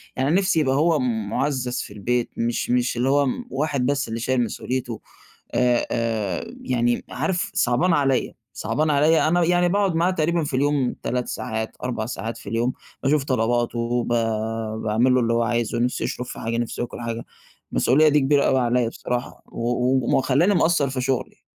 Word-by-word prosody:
يعني 130 Hz, +2 st, 0 dB
نفسي 185 Hz, -4 st, +2 dB
يبقى 135 Hz, -3 st, +2 dB
هو 155 Hz, +1 st, +3 dB
مُعزَّز 125 Hz, +2 st, -1 dB
في 100 Hz, -, -9 dB
البيت، 120 Hz, +4 st, -1 dB
مش 115 Hz, +1 st, -1 dB
مش 125 Hz, 0 st, +1 dB
اللي 125 Hz, +3 st, +1 dB
هو 140 Hz, 0 st, +3 dB, 0.2 s
واحد 140 Hz, -2 st, -1 dB
بس 140 Hz, 0 st, 0 dB
اللي 115 Hz, +1 st, -4 dB
شايل 125 Hz, +1 st, +1 dB
مسؤوليته، 120 Hz, 0 st, -4 dB, 0.5 s
آآ 125 Hz, -1 st, +2 dB
آآ، 110 Hz, -6 st, -2 dB
يعني 120 Hz, -1 st, 0 dB
عارف 175 Hz, +8 st, -1 dB
صعبان 130 Hz, +8 st, +2 dB
عليَّا 135 Hz, -4 st, +1 dB, 0.2 s
صعبان 155 Hz, 0 st, -1 dB
عليَّا، 155 Hz, +2 st, +4 dB
أنا 175 Hz, +1 st, +3 dB
يعني 175 Hz, +1 st, +3 dB
باقعد 195 Hz, -1 st, +1 dB
معاه 170 Hz, +3 st, +2 dB
تقريبًا 170 Hz, -1 st, 0 dB
في 145 Hz, -3 st, -2 dB
اليوم 140 Hz, -2 st, +1 dB
3 125 Hz, 0 st, -2 dB
ساعات، 110 Hz, -2 st, -4 dB
4 115 Hz, -3 st, -2 dB
ساعات 115 Hz, -1 st, -5 dB
في 105 Hz, -, -10 dB
اليوم، 115 Hz, +3 st, 0 dB, 0.3 s
باشوف 140 Hz, 0 st, +2 dB
طلباته، 120 Hz, -2 st, 0 dB
وب 120 Hz, +1 st, -1 dB, 0.7 s
باعملُّ 115 Hz, +4 st, +2 dB
له 130 Hz, -, +4 dB
اللي 115 Hz, 0 st, +1 dB
هوعايزُه، 115 Hz, 0 st, 0 dB
نفسه 125 Hz, +1 st, 0 dB
يشرب 125 Hz, -, -3 dB
في -, -, -8 dB
حاجة، 115 Hz, +1 st, -2 dB
نفسه 120 Hz, 0 st, -3 dB
ياكُل 120 Hz, -, -4 dB
حاجة، 115 Hz, 0 st, -4 dB, 0.5 s
المسؤوليّة 150 Hz, +5 st, +4 dB
دي 150 Hz, 0 st, +4 dB
كبيرة 140 Hz, +1 st, +3 dB
أوي 130 Hz, -, +3 dB
عليَّا 120 Hz, -1 st, +1 dB
بصراحة، 120 Hz, +2 st, -4 dB
و -, -, -12 dB
و 125 Hz, +2 st, +2 dB
ومخليّاني 140 Hz, +9 st, +3 dB
مقصَّر 160 Hz, -5 st, +2 dB
في 130 Hz, -, -3 dB
شغلي. 130 Hz, 0 st, -2 dB
125 Hz, 175 wpm, -23 LUFS, 120-145 Hz, 0.7 s, عليَّا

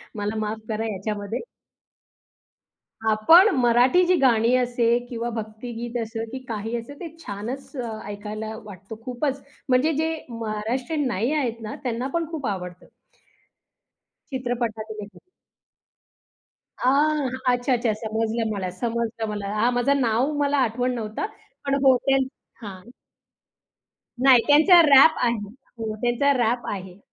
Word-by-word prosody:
मला 210 Hz, +1 st, -3 dB
माफ 215 Hz, +1 st, -2 dB
करा 220 Hz, +1 st, -2 dB
याच्यामध्ये. 205 Hz, +3 st, -4 dB, 1.7 s
आपण 325 Hz, -, +7 dB
मराठी 245 Hz, +8 st, +4 dB
जी 365 Hz, +1 st, +4 dB
गाणी 235 Hz, -2 st, +4 dB
असते 240 Hz, -1 st, +2 dB
किंवा 235 Hz, 0 st, -3 dB
भक्तिगीत 230 Hz, +2 st, -6 dB
असे 225 Hz, 0 st, -4 dB
की 260 Hz, -, -5 dB
काही 225 Hz, +1 st, -3 dB
असे, 235 Hz, +5 st, -8 dB
ते 345 Hz, -, -6 dB
छानचं 235 Hz, 0 st, -6 dB
ऐकायला 215 Hz, +2 st, -6 dB
वाटतं 195 Hz, +1 st, -10 dB
खूपच. 270 Hz, +2 st, -2 dB, 0.3 s
म्हणजे 265 Hz, +6 st, +3 dB
जे 320 Hz, +1 st, 0 dB
महाराष्ट्रीयन 235 Hz, +6 st, -2 dB
नाही 235 Hz, +5 st, -1 dB
आहेत 240 Hz, -6 st, -1 dB
ना. 215 Hz, -1 st, -6 dB
त्यांना 245 Hz, +1 st, -2 dB
पण 335 Hz, -1 st, 0 dB
खूप 300 Hz, -5 st, -5 dB
आवडतं. 180 Hz, -3 st, -5 dB, 1.5 s
चित्रपटातीलही. 220 Hz, -4 st, -4 dB, 1.6 s
आह! 285 Hz, +2 st, +2 dB, 0.3 s
अच्छा-अच्छा. 245 Hz, -2 st, +1 dB
समजलं 225 Hz, 0 st, -1 dB
मला, 190 Hz, -3 st, -3 dB
समजलं 230 Hz, -1 st, -2 dB
मला. 205 Hz, -1 st, -4 dB
हां, 235 Hz, +4 st, +2 dB
माझं 275 Hz, +3 st, +2 dB
नाव 240 Hz, +5 st, +1 dB
मला 285 Hz, 0 st, +1 dB
आठवण 250 Hz, +3 st, -1 dB
नव्हतं. 220 Hz, -, -3 dB, 0.4 s
पण 275 Hz, -, +1 dB
होटेल 265 Hz, 0 st, +3 dB, 0.3 s
हां. 195 Hz, -4 st, -8 dB, 1.4 s
नाही 255 Hz, -3 st, +7 dB
त्यांचा 320 Hz, +5 st, +7 dB
रॅप 295 Hz, 0 st, +7 dB
आहे. 235 Hz, -1 st, +1 dB, 0.4 s
हो, 220 Hz, -1 st, -4 dB
त्यांचा 245 Hz, +4 st, +2 dB
रॅप 240 Hz, +1 st, 0 dB
आहे. 190 Hz, -1 st, -7 dB
235 Hz, 120 wpm, -24 LUFS, 215-265 Hz, 1.7 s, आपण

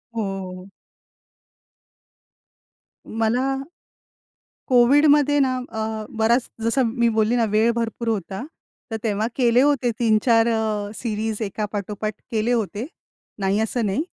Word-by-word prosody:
हो. 190 Hz, -3 st, -4 dB, 2.4 s
मला 240 Hz, +5 st, 0 dB, 1.1 s
कोविडमध्ये 290 Hz, +3 st, +5 dB
ना 260 Hz, -2 st, +2 dB
अ, 220 Hz, 0 st, -4 dB
बराच 230 Hz, +3 st, +2 dB, 0.2 s
जसं 230 Hz, +3 st, +2 dB
मी 235 Hz, 0 st, +1 dB
बोलली 220 Hz, +2 st, +1 dB
ना, 230 Hz, -2 st, +2 dB
वेळ 220 Hz, +2 st, +3 dB
भरपूर 230 Hz, 0 st, -3 dB
होता 200 Hz, 0 st, -2 dB, 0.5 s
तर 225 Hz, -, -1 dB
तेव्हा 215 Hz, -1 st, 0 dB
केले 245 Hz, -1 st, +4 dB
होते 275 Hz, -4 st, +2 dB
3-4 225 Hz, 0 st, +3 dB
अ, 215 Hz, -2 st, -1 dB
सीरीज 220 Hz, -1 st, -3 dB
एका 210 Hz, 0 st, -2 dB
पाठोपाठ 210 Hz, +1 st, -3 dB, 0.2 s
केले 220 Hz, +1 st, 0 dB
होते, 225 Hz, 0 st, -1 dB, 0.5 s
नाही 195 Hz, +1 st, +1 dB
असं 225 Hz, +1 st, 0 dB
नाही. 205 Hz, +10 st, 0 dB
225 Hz, 115 wpm, -22 LUFS, 215-240 Hz, 2.4 s, कोविडमध्ये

